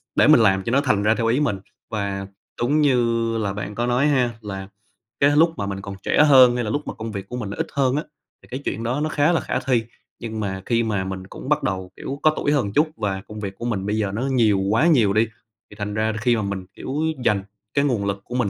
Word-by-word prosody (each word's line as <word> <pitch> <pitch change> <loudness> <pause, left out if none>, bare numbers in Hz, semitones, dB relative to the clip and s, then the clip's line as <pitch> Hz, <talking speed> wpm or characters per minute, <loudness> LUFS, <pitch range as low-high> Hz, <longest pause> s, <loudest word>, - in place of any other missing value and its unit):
để - - +5
mình 155 -4 +7
làm 95 -3 +3
cho 115 - -2
nó 140 - +3
thành 105 -8 +1
ra 110 +2 +3
theo 115 -1 0
ý 120 +4 +2
mình. 120 -10 0 0.3
Và 100 -3 -3 0.3
đúng 145 +6 +2
như 115 -4 +2
là 100 -3 -1
bạn 105 +1 -5
có 120 +2 -1
nói 125 +4 +2
ha, 130 -4 +2
là 95 -2 -6 0.5
cái 140 - +5
lúc 165 +1 +5
mà 100 - -2
mình 100 0 -4
còn 100 -1 -7
trẻ 150 - +4
hơn, 130 -4 +7
hay 120 - -1
là 105 - -3
lúc 145 +5 -2
mà - - -3
công 110 0 -6
việc 100 -1 -6
của 125 - -5
mình 105 -5 -4
nó - - -5
ít - - -2
hơn 135 -1 +2
á, 150 - -1 0.4
thì - - -19
cái 130 +2 -4
chuyện 115 - -2
đó 125 +5 -1
nó 155 - 0
khá 150 +2 +2
là 170 - +2
khả 130 - -2
thi. 125 -3 +1 0.4
Nhưng 110 -2 -5
mà 95 -2 -3
khi 115 -1 +1
mà 105 -4 -1
mình 95 0 -6
cũng 130 - -9
bắt 150 0 +2
đầu, 95 -1 -3
kiểu, 140 +1 -6
có 155 0 +5
tuổi 145 - 0
hơn 145 -6 +2
một 100 - -4
chút, 155 +2 +4
và 95 -2 -2
công 105 0 -8
việc 100 -2 -5
của 120 - -6
mình 100 -5 -2
bây 105 +1 -1
giờ 100 -3 0
nó 110 +4 -3
nhiều 115 -7 +2
quá 110 - +2
nhiều 115 -11 +4
đi, 110 +2 +3 0.4
thì - - -13
thành 105 0 -3
ra 110 +1 0
là 110 - -5
khi 120 0 +3
mà 110 - -1
mình, 100 -2 -4
kiểu, 135 - -6 0.3
dành 100 -3 +2 0.3
cái 140 0 +2
nguồn 115 -7 0
lực 100 -1 -2
của 125 - -7
mình 120 -6 +1
115 Hz, 280 wpm, -22 LUFS, 100-130 Hz, 0.5 s, mình